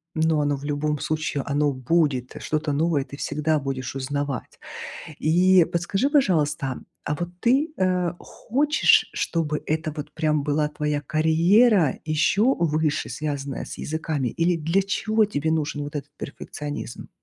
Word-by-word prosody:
ну, 160 Hz, -1 st, +2 dB
оно 145 Hz, -1 st, +1 dB
в 140 Hz, -, -9 dB
любом 150 Hz, 0 st, -1 dB
случае 155 Hz, -3 st, -2 dB
оно 145 Hz, +1 st, +1 dB
будет. 130 Hz, -1 st, 0 dB
Что-то 155 Hz, -1 st, -1 dB
новое 150 Hz, -2 st, +1 dB
ты -, -, -10 dB
всегда 150 Hz, +2 st, 0 dB
будешь 135 Hz, -2 st, -4 dB
узнавать. 140 Hz, -1 st, -3 dB, 0.6 s
И 180 Hz, +3 st, +5 dB
подскажи, 195 Hz, +10 st, 0 dB
пожалуйста, 150 Hz, -, +1 dB, 0.3 s
а 150 Hz, -, -1 dB
вот 175 Hz, 0 st, -3 dB
ты, 275 Hz, +7 st, +2 dB
а, 180 Hz, -2 st, +1 dB
хочешь, 290 Hz, +5 st, +2 dB
чтобы 155 Hz, -3 st, -1 dB
это 155 Hz, 0 st, -1 dB
вот 150 Hz, 0 st, -6 dB
прям 155 Hz, -2 st, +1 dB
была 150 Hz, +1 st, +1 dB
твоя 150 Hz, -1 st, -2 dB
карьера 165 Hz, -, +3 dB
ещё 190 Hz, -, +3 dB
выше 155 Hz, -2 st, 0 dB
связанная 140 Hz, 0 st, -4 dB
с -, -, -9 dB
языками 155 Hz, -4 st, -2 dB
или 170 Hz, +8 st, +1 dB
для 165 Hz, +5 st, +1 dB
чего 215 Hz, +3 st, +1 dB
тебе 160 Hz, -6 st, -1 dB
нужен 150 Hz, -2 st, -1 dB
вот 145 Hz, +1 st, -5 dB
этот 145 Hz, 0 st, -6 dB
перфекционизм? 145 Hz, -2 st, -6 dB
155 Hz, 145 wpm, -24 LUFS, 145-170 Hz, 0.6 s, И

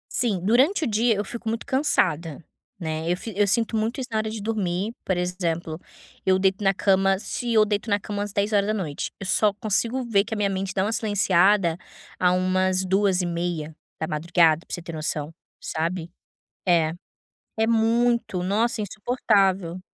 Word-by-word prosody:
Sim, 215 Hz, -7 st, +1 dB
durante 265 Hz, -, +3 dB
o 295 Hz, -, +1 dB
dia 225 Hz, +1 st, +2 dB
eu 205 Hz, -, -2 dB
fico 230 Hz, +1 st, -5 dB
muito 230 Hz, +1 st, -3 dB
cansada, 175 Hz, -, +1 dB, 0.4 s
né, 160 Hz, 0 st, -2 dB
eu 180 Hz, -, 0 dB
fi 225 Hz, -, -7 dB
eu 205 Hz, 0 st, +3 dB
sinto 225 Hz, +3 st, +1 dB
muito 225 Hz, +5 st, -1 dB
isso 255 Hz, -, -4 dB
na 220 Hz, -, 0 dB
hora 215 Hz, 0 st, -2 dB
de 220 Hz, 0 st, -5 dB
dormir, 205 Hz, -1 st, -2 dB
por 185 Hz, -2 st, -1 dB
exemplo, 170 Hz, -2 st, -2 dB, 0.4 s
eu 185 Hz, 0 st, +3 dB
deito 195 Hz, +1 st, +1 dB
na 195 Hz, -, +4 dB
cama 195 Hz, 0 st, +2 dB
se 240 Hz, +3 st, -4 dB
eu 215 Hz, -1 st, +5 dB
deito 210 Hz, +2 st, -2 dB
na 205 Hz, 0 st, +2 dB
cama 205 Hz, 0 st, -4 dB
às 205 Hz, -1 st, -3 dB
22h, 200 Hz, -6 st, -1 dB
eu 195 Hz, -, -6 dB
só 205 Hz, +2 st, +3 dB
consigo 230 Hz, +4 st, 0 dB
ver 205 Hz, -4 st, +2 dB
que 220 Hz, +1 st, -5 dB
a -, -, -4 dB
minha 200 Hz, -1 st, +1 dB
mente 190 Hz, 0 st, -3 dB
dá 190 Hz, 0 st, 0 dB
uma 220 Hz, -, -1 dB
silenciada, 195 Hz, -4 st, +2 dB, 0.4 s
a 180 Hz, -1 st, +4 dB
umas 185 Hz, +1 st, +1 dB
2h30, 170 Hz, -3 st, 0 dB
para -, -, -7 dB
você 175 Hz, -, -9 dB
ter 165 Hz, -, -7 dB
noção, 155 Hz, 0 st, -3 dB, 0.3 s
sabe. 170 Hz, +1 st, -3 dB, 0.5 s
É. 165 Hz, -3 st, +3 dB, 0.7 s
É 220 Hz, -, +4 dB
muito, 230 Hz, -4 st, +1 dB
nossa, 220 Hz, +4 st, 0 dB
é -, -, -1 dB
insuportável. 195 Hz, -5 st, 0 dB
195 Hz, 170 wpm, -24 LUFS, 175-220 Hz, 0.7 s, eu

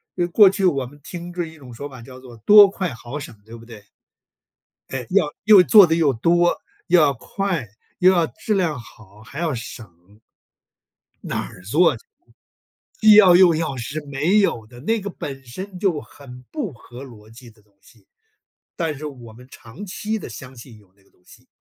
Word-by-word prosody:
呃， 175 Hz, -1 st, -1 dB
过 195 Hz, +3 st, +6 dB
去， 195 Hz, 0 st, -2 dB
我 140 Hz, -7 st, +1 dB
们 145 Hz, +4 st, -15 dB
听 175 Hz, +1 st, -9 dB
这 175 Hz, -1 st, -3 dB
一 160 Hz, 0 st, -13 dB
种 130 Hz, -5 st, -13 dB
说 140 Hz, +5 st, -8 dB
法 130 Hz, -3 st, -12 dB
叫 130 Hz, +2 st, -13 dB
做： 125 Hz, -3 st, -14 dB
“多 205 Hz, -1 st, +9 dB
快 185 Hz, -7 st, -4 dB
好 120 Hz, +5 st, -8 dB
省” 145 Hz, -, -10 dB
对 115 Hz, +1 st, -12 dB
不 115 Hz, -, -15 dB
对？ 110 Hz, -3 st, -13 dB, 1.1 s
哎， 130 Hz, -3 st, -5 dB
要 180 Hz, -6 st, +1 dB
又 210 Hz, -4 st, +7 dB
做 200 Hz, +3 st, +7 dB
得 165 Hz, -1 st, 0 dB
又 155 Hz, -5 st, +2 dB
多， 175 Hz, +8 st, +1 dB, 0.3 s
又 180 Hz, -, +4 dB
要 145 Hz, -2 st, +3 dB
快， 175 Hz, -, -4 dB, 0.3 s
又 185 Hz, +1 st, +5 dB
要 175 Hz, -3 st, +2 dB
质 220 Hz, +6 st, -4 dB
量 170 Hz, -8 st, -1 dB
好， 110 Hz, -3 st, -17 dB
还 140 Hz, +7 st, -10 dB
要 165 Hz, -3 st, -1 dB
省。 105 Hz, -5 st, -11 dB, 1.0 s
哪 -, -, -4 dB
儿 90 Hz, -, -15 dB
做 155 Hz, -, +2 dB
去！ -, -, -22 dB, 1.0 s
既 215 Hz, -1 st, +7 dB
要 190 Hz, -4 st, +7 dB
又 180 Hz, -2 st, +6 dB
要 155 Hz, -4 st, -3 dB
是 140 Hz, +6 st, -5 dB
没 150 Hz, +9 st, +1 dB
有 120 Hz, -, 0 dB
的， 120 Hz, +1 st, -15 dB
那 225 Hz, -, -1 dB
个 200 Hz, -, -5 dB
本 135 Hz, -7 st, -8 dB
身 185 Hz, +10 st, -9 dB
就 180 Hz, -6 st, 0 dB
很 125 Hz, -3 st, -14 dB
不 290 Hz, -, -4 dB
合 120 Hz, +3 st, -13 dB
逻 110 Hz, -5 st, -15 dB
辑 120 Hz, +1 st, -15 dB
的 110 Hz, -1 st, -26 dB
东 105 Hz, -1 st, -35 dB
西。 -, -, -24 dB, 0.7 s
但 160 Hz, -4 st, -3 dB
是 150 Hz, -, -8 dB
我 125 Hz, -6 st, -10 dB
们 125 Hz, +3 st, -16 dB
长 120 Hz, -, -12 dB
期 210 Hz, +3 st, -4 dB
地 -, -, -9 dB
相 130 Hz, +3 st, -11 dB
信 115 Hz, -1 st, -14 dB
有 100 Hz, -3 st, -24 dB
那 100 Hz, -, -30 dB
个 -, -, -31 dB
东 -, -, -35 dB
西， -, -, -20 dB
145 Hz, 215 characters per minute, -21 LUFS, 120-180 Hz, 1.1 s, 多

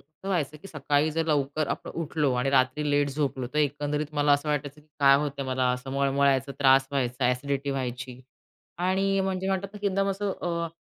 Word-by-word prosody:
असं 155 Hz, +6 st, -12 dB
व्हायचं, 155 Hz, -6 st, -1 dB
की 175 Hz, +6 st, -12 dB
सकाळी 145 Hz, 0 st, +1 dB
जर 160 Hz, +1 st, -1 dB
लवकर 145 Hz, 0 st, 0 dB
आपण -, -, -4 dB
उठलो 150 Hz, -3 st, 0 dB
आणि 125 Hz, +2 st, 0 dB
रात्री 135 Hz, +2 st, +2 dB
लेट 145 Hz, 0 st, +2 dB
झोपलो, 135 Hz, -3 st, -2 dB
तर -, -, +1 dB
एकंदरीत 150 Hz, +1 st, 0 dB
मला 145 Hz, 0 st, +3 dB
असं 145 Hz, +1 st, +1 dB
वाटायचं, 150 Hz, 0 st, -2 dB
की 150 Hz, -, -26 dB
काय 140 Hz, -1 st, +7 dB
होतंय 140 Hz, -1 st, -2 dB
मला. 130 Hz, -1 st, +1 dB
असं 125 Hz, +2 st, -5 dB
मळमळायचं, 140 Hz, 0 st, +2 dB
त्रास 135 Hz, -1 st, +5 dB
व्हायचा, 125 Hz, -2 st, -1 dB
अ‍ॅसिडिटी 140 Hz, +2 st, -1 dB
व्हायची, 130 Hz, -1 st, -4 dB, 0.6 s
आणि 190 Hz, +2 st, +1 dB
म्हणजे 190 Hz, 0 st, -2 dB
म्हणतात 195 Hz, 0 st, -1 dB
ना, -, -, -7 dB
की 205 Hz, -, 0 dB
एकदम 195 Hz, 0 st, 0 dB
असं 195 Hz, +1 st, -2 dB
अ, 170 Hz, -1 st, -1 dB
145 Hz, 195 wpm, -27 LUFS, 135-155 Hz, 0.6 s, काय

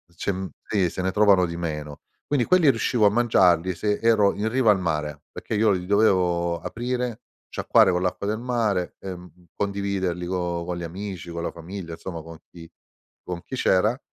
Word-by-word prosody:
c'è 100 Hz, -, -1 dB, 0.3 s
sì, 95 Hz, -5 st, +1 dB
se 95 Hz, -, -4 dB
ne 95 Hz, 0 st, 0 dB
trovano 100 Hz, -3 st, +4 dB
di 85 Hz, 0 st, -6 dB
meno. 75 Hz, -3 st, -5 dB, 0.3 s
Quindi 140 Hz, -5 st, +1 dB
quelli 180 Hz, -6 st, +5 dB
riuscivo 115 Hz, -2 st, +2 dB
a -, -, +6 dB
mangiarli 95 Hz, -6 st, +3 dB
se 105 Hz, +4 st, -1 dB
ero 110 Hz, -3 st, +4 dB
in 105 Hz, +2 st, -1 dB
riva 125 Hz, -2 st, +2 dB
al 95 Hz, -, +2 dB
mare, 75 Hz, -3 st, -3 dB
perché 110 Hz, -, -5 dB
io 105 Hz, 0 st, +3 dB
li 90 Hz, -2 st, -1 dB
dovevo 90 Hz, -5 st, +2 dB
aprire, 125 Hz, 0 st, -3 dB, 0.3 s
sciacquare -, -, +4 dB
con 90 Hz, 0 st, 0 dB
l'acqua 95 Hz, +2 st, -2 dB
del 110 Hz, +1 st, 0 dB
mare 115 Hz, -7 st, -1 dB
e 95 Hz, -2 st, -6 dB, 0.4 s
condividerli 100 Hz, -3 st, -2 dB
con 90 Hz, -2 st, -2 dB
con 90 Hz, 0 st, -3 dB
gli 85 Hz, -, -5 dB
amici, 90 Hz, 0 st, -6 dB
con 85 Hz, 0 st, -4 dB
la -, -, -2 dB
famiglia, 85 Hz, 0 st, -8 dB
insomma 85 Hz, -1 st, -7 dB
con 80 Hz, 0 st, -11 dB
chi 85 Hz, -1 st, -12 dB, 0.5 s
con 90 Hz, -1 st, -5 dB
chi 130 Hz, -, -6 dB
c'era, 110 Hz, +3 st, +2 dB
95 Hz, 185 wpm, -24 LUFS, 85-110 Hz, 0.5 s, a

